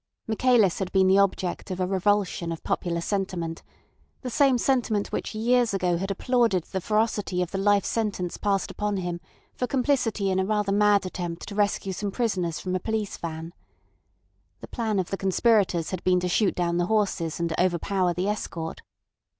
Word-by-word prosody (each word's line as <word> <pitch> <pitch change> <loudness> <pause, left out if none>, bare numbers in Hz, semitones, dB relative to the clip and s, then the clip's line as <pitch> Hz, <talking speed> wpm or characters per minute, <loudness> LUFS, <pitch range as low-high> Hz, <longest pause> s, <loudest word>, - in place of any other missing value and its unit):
Michaelis 225 -4 +3
had 190 -2 -3
been 190 -1 +4
the 190 +1 +5
object 190 -2 0
of 185 -1 -4
a 185 - +1
revulsion 190 -2 0
of 165 - -6
popular 170 -2 -1
sentiment, 175 -4 -3 0.6
the 250 - -4
same 270 0 +4
sentiment 235 -5 0
which - - -3
years 235 0 +2
ago 180 -2 +1
had 195 +3 -3
applauded 225 -3 +1
the 190 +2 -4
ferocity 210 -2 0
of 180 - -7
the 195 - -2
life 200 0 +3
sentence 205 -6 -2
passed 200 -2 0
upon 210 -1 -2
him 175 -2 -3 0.3
for 250 - -2
complicity 245 -7 +1
in 190 - +1
a - - +2
rather 210 -1 0
mad 205 -1 +4
attempt 175 -2 -5
to 205 - -6
rescue 200 -2 0
some 205 +2 -3
prisoners 190 -7 -1
from 185 0 -3
a - - 0
police 220 +1 -2
van. 165 0 -6 1.1
The - - -8
plan 220 -3 -2
of 185 -2 -1
the 195 - -1
conspirators 190 -3 +2
had 185 -2 -4
been 180 -1 +3
to 180 - -1
shoot 195 +3 +2
down 170 -1 0
the 175 0 +1
horses 190 -7 0
and 170 -1 -1
overpower 185 +1 +1
the 180 +3 -1
escort. 170 -6 -4
195 Hz, 185 wpm, -26 LUFS, 180-215 Hz, 1.1 s, the